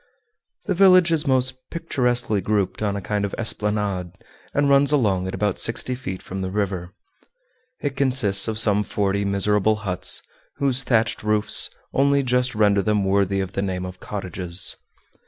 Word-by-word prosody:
The 195 - -1
village 185 -2 +4
is 160 -2 0
most 130 -1 -1
picturesquely 125 - -1
grouped 100 0 -2
on 105 -2 -2
a 100 - -5
kind 105 +2 -3
of 100 - -4
esplanade, 105 -5 -3 0.4
and 145 0 0
runs 140 0 +3
along 100 -10 0
at 95 - -5
about 105 -3 -2
sixty 115 +2 0
feet 95 -8 -7
from 95 +1 -7
the 95 - -4
river. 95 -3 -4 0.9
It 140 -2 -4
consists 125 -8 +2
of 110 -1 -2
some 105 -2 +4
forty 100 -1 -2
miserable 105 +2 +1
huts, 90 -1 +2 0.3
whose 135 -2 +1
thatched 115 -3 -1
roofs 105 0 +7 0.2
only 140 +1 +1
just 125 -1 -1
render 105 -2 +2
them 105 0 -1
worthy 100 0 0
of 95 -1 -6
the 100 - -4
name 95 -2 -4
of 90 0 -10
cottages. 90 -3 -3
105 Hz, 160 wpm, -21 LUFS, 95-130 Hz, 0.9 s, roofs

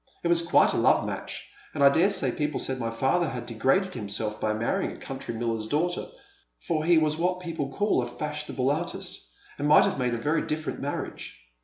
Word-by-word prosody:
It 170 - +1
was 170 -1 +4
quite 170 0 +4
a - - 0
love - - +4
match, - - -5 0.3
and 140 - +1
I 140 - +9
dare 165 +8 +4
say 200 -2 +1
people 150 -1 -2
said 130 -1 -2
my 115 -2 -1
father 135 +8 +1
had 125 -2 -5
degraded 135 - +1
himself 105 -1 -3
by 110 - +1
marry 110 +2 0
ing - - -4
a - - -11
country 115 - -6
miller's 115 -1 -2
daughter, 170 +8 -1 0.5
for 160 -3 -1
he 170 0 +5
was 155 -1 +2
what 180 +2 0
people 165 -6 -4
call 205 +8 +1
a - - -3
fashionable 150 -3 -2
artist, 145 - -4 0.3
and 145 - 0
might 150 - +7
have - - -1
made 125 -2 0
a - - -2
very 150 +8 +1
different 155 +1 -3
marriage. 140 +1 -5
150 Hz, 210 wpm, -27 LUFS, 120-170 Hz, 0.5 s, I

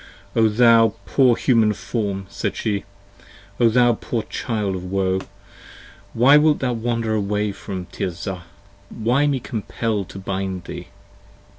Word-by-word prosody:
O 115 -1 +5
thou 115 -1 +5
poor 130 -3 +4
Human 115 -4 +3
Form! 100 -2 -3
said - - -3
she. 100 -2 -2 0.7
O 120 - +5
thou 120 +1 +4
poor 115 0 -3
child 105 -4 -3
of 90 - -6
woe! 95 0 0
45 - - -12 0.8
Why 135 +5 +6
wilt 150 0 +4
thou 125 -2 -1
wander 115 -1 -1
away 105 0 0
from 95 -2 -6
Tirzah: 90 +1 -5 0.4
why 125 +6 +1
me 140 -2 +1
compel 110 -3 -3
to 95 - -11
bind 95 -1 -4
thee? - - -8
110 Hz, 140 wpm, -21 LUFS, 95-120 Hz, 0.8 s, Why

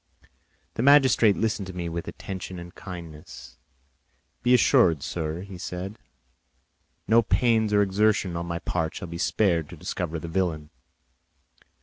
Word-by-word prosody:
The - - -3
magistrate 130 -6 +5
listened 110 -3 -1
to 95 - -7
me 85 -1 -3
with 85 0 -5
attention 95 -1 -7
and 85 +1 -9
kindness. 85 -4 -10 0.8
"Be 125 +1 +4
assured, 95 - +4
sir," 80 +2 -4
said 95 +3 -6
he, - - -34 1.0
"no 115 +1 +5
pains 115 -2 +2
or 105 0 +4
exertions 100 -2 +1
on 85 0 -4
my 85 0 -3
part 85 -1 -2
shall 90 - -6
be 85 0 -6
spared 85 -6 +1
to 85 - -10
discover 85 0 -4
the 85 - -7
villain." 80 -4 -2
90 Hz, 140 wpm, -26 LUFS, 85-105 Hz, 1.0 s, magistrate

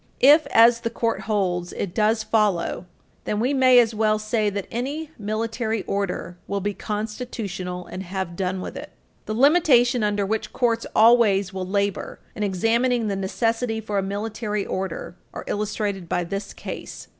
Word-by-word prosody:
If, 295 +4 +7
as 230 +1 +6
the 230 0 -2
Court 230 -3 -1
holds, 180 -4 0
it 185 -4 -4
does 220 0 +2
follow, 210 -5 0 0.4
then 210 - -1
we 250 +5 +1
may 260 -2 +5
as 235 -2 +5
well 215 0 +2
say 215 0 0
that 200 -1 -4
any 285 +7 -4
military 220 0 -2
order 195 -3 -3
will 200 - -1
be 205 +1 -2
constitutional, 205 -4 -5
and 185 - -7
have 190 -2 -4
done 185 0 -2
with - - -6
it. - - -7 0.4
The 215 - -2
limitation 255 -3 +4
under 205 -1 +1
which 215 +1 -3
courts 230 -2 0
always 215 -4 +5
will 185 -1 -4
labor 200 0 -1 0.2
in - - -6
examining 225 +4 +1
the 200 - -1
necessity 225 +4 -1
for 210 -2 -2
a - - +1
military 210 +1 -3
order 185 -1 -4 0.2
are - - -5
illustrated 205 -3 -3
by 175 - 0
this 195 +3 -5
case. - - -8
210 Hz, 165 wpm, -23 LUFS, 195-230 Hz, 0.4 s, If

